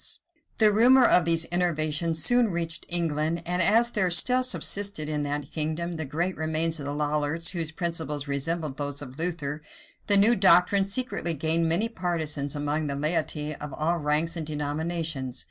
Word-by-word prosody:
Sleidan - - -6 0.4
The 215 -2 +4
rumor 250 +4 +6
of 180 - +5
these 165 -1 +2
innovations 160 -2 0
soon 245 +4 +4
reached 170 -4 -4
England 165 -1 -1
and 180 +1 -1
as 230 +6 +4
there 190 -5 +1
still 250 +9 +3
subsisted 200 -9 0
in 150 -1 -2
that 145 -1 -4
kingdom 160 +2 -3
great 160 +4 -3
remains 160 +1 -1
of 140 - -6
the - - -3
Lollards, 150 +2 0
whose 165 -4 -3
principles 160 -3 -3
resembled 150 +1 -3
those 145 -1 -4
of 135 +1 -11
Luther, 155 -4 -2 0.5
the 205 - +5
new 215 +4 +6
doctrines 195 +1 +3
secretly 225 -8 -1
gained 160 +2 0
many 185 +8 +1
partisans 160 -9 -2
among 145 +1 -2
the 140 - -3
laity 155 0 -2
of 150 -1 -8
all 170 +3 -1
ranks 150 +3 0
and 160 -3 -5
denominations. 150 -3 -3
165 Hz, 165 wpm, -26 LUFS, 150-175 Hz, 0.5 s, rumor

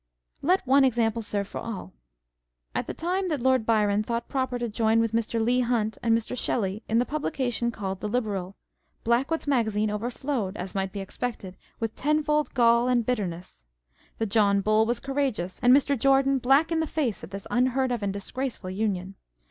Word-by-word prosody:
Let 360 +3 +2
one 270 +2 +5
example 230 -3 +1
serve 205 -2 -2
for - - -6
all. 210 - -6 0.8
At - - -2
the - - -3
time 370 +3 -1
that 295 -6 -2
Lord 260 -4 +2
Byron 210 -2 +3
thought 235 +2 -3
proper 260 -2 -1
to 240 0 -2
join 220 +1 +2
with 230 -1 +1
Mr. 230 0 -1
Leigh 240 +3 +2
Hunt 230 -3 0
and 230 -1 +3
Mr. 230 +2 -4
Shelley 210 -4 -1
in 225 - +2
the 245 - +3
publication 255 -5 -1
called 195 -4 -4
the 210 - -3
Liberal, 200 -5 -2 0.5
Blackwood's 260 +8 +1
Magazine 220 -6 +1
overflowed, 230 -1 -3
as 180 +1 -5
might 195 -1 -2
be 200 - -5
expected, 195 -2 -5 0.2
with 225 -1 -2
tenfold 300 0 +1
gall 235 0 +4
and 245 -2 +2
bitterness; 180 - -4 0.5
the 225 - 0
John 200 -1 +3
Bull 215 +2 +3
was 240 0 0
outrageous; 265 -10 -1
and 245 -1 +4
Mr. 280 +1 +4
Jordan 270 +1 +3
black 270 +7 +3
in 325 - +1
the 320 - 0
face 275 - -2
at 160 - -8
this 195 0 -7
unheard 255 +1 +2
of 240 -3 -1
and 200 -1 -1
disgraceful 205 0 -4
union. 190 -2 -2
230 Hz, 185 wpm, -26 LUFS, 210-260 Hz, 0.8 s, one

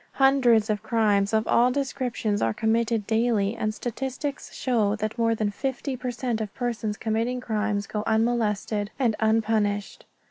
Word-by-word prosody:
Hundreds 260 -5 +4
of 210 -1 -2
crimes 210 -3 +2
of 220 0 +1
all 245 +1 +4
descriptions 250 -5 -1
are 115 - +1
committed 225 -1 +1
daily 225 -2 +1
and 215 -2 -1
statistics 265 +5 -4
show 220 -5 +1
that 215 0 -3
more 230 -1 +2
than 215 -2 -1
fifty 265 +4 -3
per 250 0 -4
cent 240 -2 -2
of 210 -2 -4
persons 225 -4 -2
committing 230 +3 -1
crimes 215 -3 -1
go 210 +1 -3
unmolested 220 -2 0
and 235 -5 +1
unpunished. 220 -2 0
225 Hz, 150 wpm, -25 LUFS, 210-245 Hz, -, Hundreds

